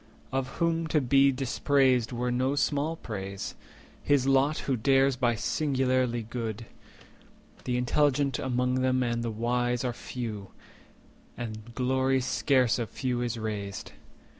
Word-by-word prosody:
Of 135 -1 -1
whom 165 -1 +1
to 155 0 +2
be 135 +1 +4
dispraised 130 -2 +2
were 125 0 -1
no 130 +3 +1
small 145 +2 0
praise— 100 -8 -6 0.5
His 145 -3 +2
lot 135 +3 +3
who 135 - +1
dares 135 +3 +3
be 120 -2 +1
singularly 130 -3 0
good. 115 -1 -5 1.0
The 125 -1 0
intelligent 140 +1 +1
among 125 0 0
them 130 0 +2
and 120 -1 -1
the 115 - -2
wise 120 +2 0
Are 125 -1 -1
few, 110 -5 -6 0.9
and 115 0 -7
glory 130 +1 +1
scarce 130 -2 +2
of 115 - -3
few 125 -2 -2
is 120 -1 -2
raised. 105 -3 -5
125 Hz, 135 wpm, -28 LUFS, 120-135 Hz, 1.0 s, be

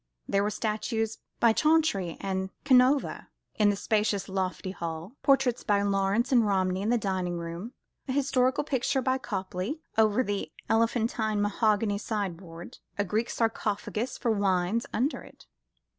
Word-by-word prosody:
There 195 - +2
were 205 - +1
statues 220 +1 -2 0.2
by 230 -1 +5
Chantrey 305 - +2
and 190 -1 -2 0.2
Canova 260 +1 +3 0.3
in 210 -1 +5
the 205 - +2
spacious 210 -1 0
lofty 190 0 -2
hall; 170 +2 -6
portraits 270 -3 +3
by 200 -1 +2
Lawrence 200 +4 +1
and 240 -3 +5
Romney 190 -2 +1
in 210 - -1
the 240 - +3
dining 185 -4 -2
room; 170 +8 -6 0.3
a - - -2
historical 260 -1 +2
picture 265 -1 0
by 260 +1 +1
Copley 195 - -4 0.2
over 220 +3 +4
the 205 -4 -3 0.2
elephantine 225 -1 +1
mahogany 205 0 +1
sideboard; 185 -6 -5 0.2
a 205 - +2
Greek 215 +5 -1
sarcophagus 225 +1 -2
for 235 - 0
wines 200 +1 +1
under 260 +7 0
it. - - -16
210 Hz, 145 wpm, -28 LUFS, 195-240 Hz, 0.3 s, by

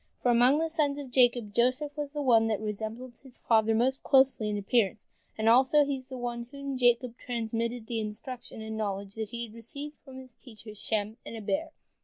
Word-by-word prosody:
For 245 - +4
among 245 +4 +5
the 325 +1 +1
sons 300 -3 0
of 280 -3 -7
Jacob 245 -4 +3
Joseph 255 +6 +1
was 295 -2 -4
the 295 -1 -3
one 225 -4 +5
that 215 -2 0
resembled 220 +3 -5
his 265 -3 -14
father 220 -1 +3
most 260 +4 +1
closely 265 -5 +3
in 205 - -1
appearance, 205 0 +1 0.3
and, 220 0 0
also, 265 +5 +6
he 280 -1 -1
was 260 0 -13
the 260 - -6
one 240 -1 -4
to 235 - -31
whom 280 -1 -4
Jacob 245 -1 +2
transmitted 230 0 -3
the 230 -1 -2
instruction 220 +2 -6
and 220 0 -5
knowledge 200 -2 -3
he 225 +2 -4
had 220 - -14
received 280 +6 -8
from 265 -2 -11
his 260 -2 -11
teachers 215 -4 -12
Shem 215 0 -1
and - - -8
Eber. 290 +9 -2
240 Hz, 205 wpm, -29 LUFS, 220-265 Hz, 0.3 s, also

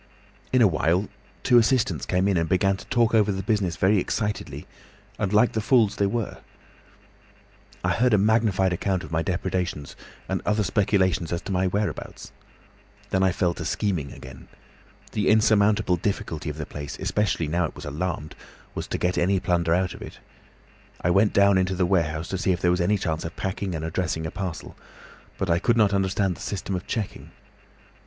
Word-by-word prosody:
"In 130 -2 +5
a - - +7
little 90 -6 +1
while 90 +6 +1 0.3
two 120 - +6
assistants 110 - +1
came 90 +1 +1
in 100 - +2
and 80 -2 0
began 95 +1 +2
to 95 - -11
talk 120 -3 +2
over 105 -2 +4
the 95 0 -3
business 100 -5 0
very 95 +5 +3
excitedly 105 +3 -3 0.5
and 100 - -1
like 105 +3 +4
the 110 - -1
fools 110 -2 +3
they 100 - +2
were. 110 +1 -3 1.4
I - - +1
heard 125 +1 +2
a 105 - +5
magnified 100 -3 +2
account 95 +1 -1
of - - -10
my 80 0 +1
depredations, 90 -4 -3 0.3
and - - -2
other 105 0 +1
speculations 95 -5 +1
as 85 - -1
to - - -5
my 95 0 +1
whereabouts. 100 +3 -3 0.8
Then 95 - +2
I 95 -1 +4
fell 90 -1 0
to - - -6
scheming 90 -10 -1
again. 65 +1 -11 0.6
The 105 - 0
insurmountable 105 -3 +3
difficulty 80 -4 -3
of 75 - -6
the 75 - -4
place, 70 -2 -7
especially 105 -6 0
now 85 +3 +1
it - - -7
was - - -9
alarmed, 75 +1 -4 0.4
was - - -5
to - - -2
get 90 +1 0
any 95 +2 +2
plunder 85 -2 +1
out 90 0 0
of - - -12
it. - - -9 0.8
I 90 - +2
went 100 +3 +4
down 100 -1 +4
into 95 0 0
the 90 0 +1
warehouse 85 -3 0
to 95 - -3
see 95 - +1
if 90 - 0
there 90 - +2
was 90 0 +1
any 100 +4 +2
chance 80 -5 -2
of 80 - -6
packing 95 -1 -3
and 80 0 -4
addressing 80 -1 -2
a 80 - -4
parcel, 95 -4 -6 0.6
but 95 - -2
I 85 - +3
could 120 +4 +2
not 105 -3 +4
understand 95 -1 +1
the - - -12
system 100 -1 -4
of 90 - -5
checking. 110 -5 -4
95 Hz, 195 wpm, -25 LUFS, 85-105 Hz, 1.4 s, a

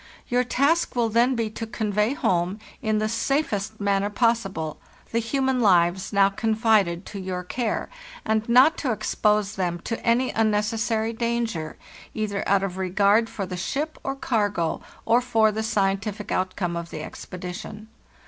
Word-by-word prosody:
Your 250 +1 +2
task 280 +6 +1
will 235 -2 +2
then 240 +4 +3
be 225 -2 -1
to 225 +1 -5
convey 215 +2 0
home, 180 -4 0 0.2
in 215 -1 +1
the 215 0 +1
safest 220 -3 -1
manner 200 0 +1
possible, 200 -9 0 0.3
the 230 - +1
human 265 +2 0
lives 185 -3 +3
now 200 -1 +5
confided 215 -4 +1
to 200 - -7
your 185 -1 -4
care, 225 +4 -2 0.4
and 220 +1 0
not 260 +7 +6
to 265 - 0
expose 210 -1 0
them 175 -2 -1
to 230 - -4
any 245 +2 +2
unnecessary 220 +1 0
danger, 230 -8 -2 0.4
either 210 -2 -2
out 195 0 +3
of 190 -1 -3
regard 200 +4 +3
for 195 - -4
the 180 0 -5
ship 290 - -3
or 270 - -2
cargo, 205 -10 0 0.2
or 235 +2 +4
for 225 -3 +3
the 215 +1 -2
scientific 205 -1 -1
outcome 185 -1 -1
of 170 0 -5
the 155 -2 -6
expedition. 190 +6 -8
215 Hz, 155 wpm, -24 LUFS, 195-230 Hz, 0.4 s, not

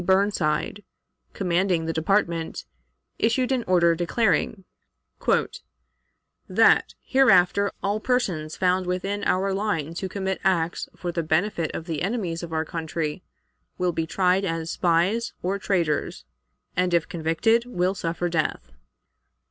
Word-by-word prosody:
Burnside, 190 0 +1 0.5
commanding 180 -2 +1
the 165 - -2
Department, 170 -1 0 0.5
issued 250 +3 +1
an 255 -2 +1
order, 170 -2 +4
declaring 185 +2 0 1.8
"That, - - +4
hereafter, 200 -6 +4
all 205 +2 0
persons 185 -11 -1
found 185 0 +1
within 195 +3 -2
our 195 +1 +1
lines 175 -6 -2
who 190 - -4
commit 190 -1 -3
acts 175 -3 0
for 175 - -4
the 170 - -1
benefit 165 +1 0
of 165 - -5
the 160 -4 -3
enemies 185 -5 -2
of 170 -2 -7
our 160 0 -1
country 160 0 -3 0.6
will 180 -1 +1
be 165 -1 -2
tried 185 +2 +2
as 165 -3 -2
spies 185 +7 +1
or 195 +2 -1
traitors, 165 - -1 0.5
and, 180 -1 +2
if 165 -1 +1
convicted, 180 +8 +1
will 185 -5 0
suffer 170 -2 -2
death." 155 - -2
180 Hz, 125 wpm, -25 LUFS, 165-200 Hz, 1.8 s, order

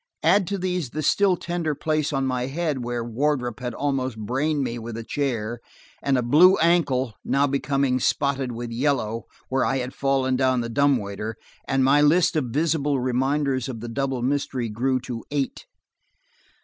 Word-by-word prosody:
Add 185 +2 +4
to 200 - -2
these 180 -6 -2
the 155 +5 -4
still 190 +4 +3
tender 170 -4 -2
place 155 0 -1
on 135 -2 0
my 125 -1 -1
head 150 -2 -2
where 120 -1 -2
Wardrop 125 0 -1
had 125 -2 -4
almost 130 -4 -1
brained 135 +7 -1
me 120 -1 -3
with 115 0 -6
a 115 - -5
chair, 120 -4 -2 0.4
and 140 -2 +2
a 125 - 0
blue 165 +10 +6
ankle, 140 -8 +2
now 140 +1 +2
becoming 140 -2 0
spotted 135 0 0
with 120 0 -6
yellow, 115 -3 -1 0.2
where 130 0 +1
I 135 - +1
had 125 0 -4
fallen 135 -1 +1
down 130 -1 +2
the 115 - -4
dumbwaiter, 115 -5 0 0.3
and 135 -1 +2
my 140 +3 +5
list 170 +4 +4
of 150 -4 +1
visible 145 +1 0
reminders 130 +1 0
of 120 -3 -5
the 120 +1 -6
double 135 0 -2
mystery 130 -3 -1
grew 130 +4 0
to 120 -2 -6
eight. 140 -2 -3
135 Hz, 175 wpm, -24 LUFS, 120-145 Hz, 0.4 s, blue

